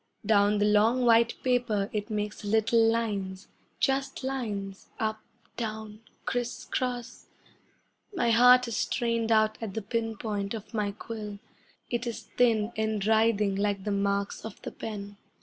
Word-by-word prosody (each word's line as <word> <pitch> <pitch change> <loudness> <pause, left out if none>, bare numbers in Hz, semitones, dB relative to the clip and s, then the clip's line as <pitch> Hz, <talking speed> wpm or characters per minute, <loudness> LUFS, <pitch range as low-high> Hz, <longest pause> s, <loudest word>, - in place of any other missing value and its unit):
Down 205 0 +4
the 205 - +2
long, 220 +4 +4
white 230 0 +5
paper 240 -6 +1
it 210 +1 -2
makes 210 0 -3
little 220 +2 +3
lines, 200 -4 -2 0.3
Just 270 0 0
lines 210 -7 -4
up 220 0 -1 0.4
down 220 -1 -5 0.2
criss 245 0 -2
cross. 250 -1 -3 0.8
My 295 - +1
heart 250 +2 +7
is 230 - -3
strained 230 -2 0
out 215 -1 +3
at 215 -4 -5
the 220 - -1
pin 225 +1 -2
point 205 -1 -3
of 220 +2 -9
my 210 -2 0
quill; 210 0 -7 0.5
It 240 0 -1
is 235 - -4
thin 225 -3 +3
and 220 -2 -1
writhing 220 -2 +3
like 200 -1 0
the 210 - -2
marks 200 0 -1
of 220 -2 -8
the - - -5
pen. 205 -2 -7
220 Hz, 150 wpm, -28 LUFS, 205-235 Hz, 0.8 s, heart